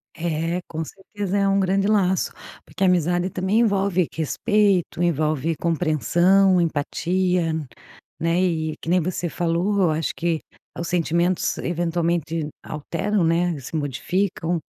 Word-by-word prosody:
É, 165 +1 -2
com 160 0 -4
certeza 200 +2 -4
é 200 - +2
um 195 0 +3
grande 195 +1 +1
laço, 190 -3 +2 0.3
porque 190 - -4
a - - +5
amizade 175 +1 +1
também 190 +6 +1
envolve 195 -5 +2
respeito, 185 - +1
envolve 155 -2 +1
compreensão, 175 +4 +3
empatia, 170 +2 0 0.7
né? 165 +2 +1
E 160 -4 0
que - - -5
nem 180 +1 +3
você 175 +1 -2
falou, 175 +5 0
eu 180 - +4
acho 155 0 -1
que 165 -1 0 0.4
os 170 - -3
sentimentos 175 +1 +1
eventualmente 170 -2 -1 0.2
alteram, 170 +6 -2
né, 165 -1 +1
se 135 +5 -8
modificam, 165 +4 -1
175 Hz, 130 wpm, -23 LUFS, 165-190 Hz, 0.7 s, a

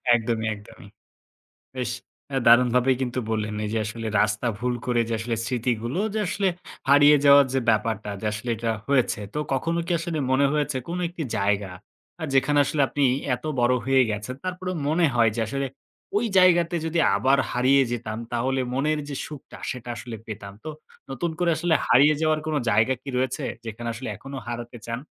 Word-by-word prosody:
একদমই, 115 -1 -1
একদমই। 105 -1 -14 0.9
বেশ 125 -2 -2 0.4
আ - - +1
দারুণভাবেই 125 +2 +5
কিন্তু 125 -1 -2
বললেন, 110 -1 -2
এই 105 - -3
যে - - +1
আসলে 115 +1 -5
রাস্তা 105 +3 0
ভুল 125 +2 -1
করে 120 -1 +2
যে - - -3
আসলে 115 0 -2
স্মৃতিগুলো 120 +2 -2 0.2
যে - - 0
আসলে 200 0 +1 0.4
হারিয়ে 145 +1 +7
যাওয়ার 140 -1 +8
যে 135 - +2
ব্যাপারটা 110 -1 -1
যে 110 - -4
আসলে 105 +3 -4
এটা 115 +1 -2 0.2
হয়েছে। 130 -6 +2
তো - - -1
কখনো 165 +6 0
কি 175 - -1
আসলে 165 -1 -3
মনে 140 +2 +4
হয়েছে 150 -2 0
কোনো 175 +1 -3
একটি 175 -1 -6
জায়গা, 100 -1 0 0.5
আ - - -3
যেখানে 135 +2 +3
আসলে 145 +2 -2
আপনি 145 - 0 0.3
এত - - -20 0.2
বড় 120 +1 +3
হয়ে 135 -1 +5
গেছেন 105 +4 -4
তারপরেও 185 0 -3
মনে 165 +3 +3
হয়, 115 -2 +4
যে - - -1
আসলে 135 +4 -2 0.5
ওই 225 +3 +2
জায়গাতে 175 -2 +4
যদি 160 +1 -1 0.2
আবার 130 +7 +3
হারিয়ে 130 +3 +4
যেতাম, 110 -2 -4
তাহলে 130 +3 0
মনের 150 +3 +1
যে 145 - -4
সুখটা 150 -3 -11
সেটা 125 -1 -7
আসলে 120 +1 -7
পেতাম। 105 -2 -7
তো - - -5 0.4
নতুন 135 +6 -2
করে 175 -1 +2
আসলে 165 +1 +1
হারিয়ে 145 +5 +6
যাওয়ার 155 -1 +2
কোনো 155 -1 0
জায়গা 110 +5 +3
কি 140 - -10
রয়েছে 130 +2 -1 0.2
যেখানে 115 +1 -6
আসলে 125 +2 -6
এখনও 135 +5 -8
হারাতে 120 0 -6
চান? 115 0 -3
130 Hz, 180 wpm, -24 LUFS, 115-150 Hz, 0.9 s, যাওয়ার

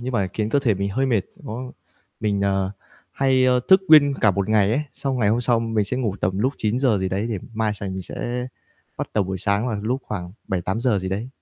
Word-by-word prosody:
nhưng 125 +1 -4
mà 100 -6 0
khiến 110 -1 -1
cơ 145 - +3
thể 115 -7 +2
mình 100 +1 -2
hơi 135 +6 0
mệt, 115 -5 +2 0.2
nó 125 +4 -6 0.5
mình, 105 -3 0
ờ, 95 -1 +1 0.4
hay, 130 -1 +2
ờ, 125 -1 +4
thức 190 0 +7
nguyên 145 -3 +7
cả 105 - +5
một 100 +1 -1
ngày 105 -2 +3
ấy, 140 - +1
xong 135 -2 -2
ngày 105 -4 +2
hôm 115 +3 +2
sau 120 -1 +2
mình 115 -2 0
sẽ 125 +6 -2
ngủ 110 -7 -1
tầm 95 +2 0
lúc 130 +6 +1
9:00 115 0 +1
gì 95 0 -1
đấy 100 +4 -1
để 105 - -2 0.2
mai 110 -1 0
sành 100 -2 -5
mình 95 - -5
sẽ 125 +6 -4 0.5
bắt - - -4
đầu 105 -3 +2
buổi 95 0 -4
sáng 100 +4 +1
vào 110 - -1
lúc 125 +5 -1
khoảng 90 -4 -5 0.2
7:00-8:00 100 +5 0
gì 95 0 -4
đấy. 105 +6 -3
110 Hz, 240 wpm, -23 LUFS, 100-125 Hz, 0.5 s, thức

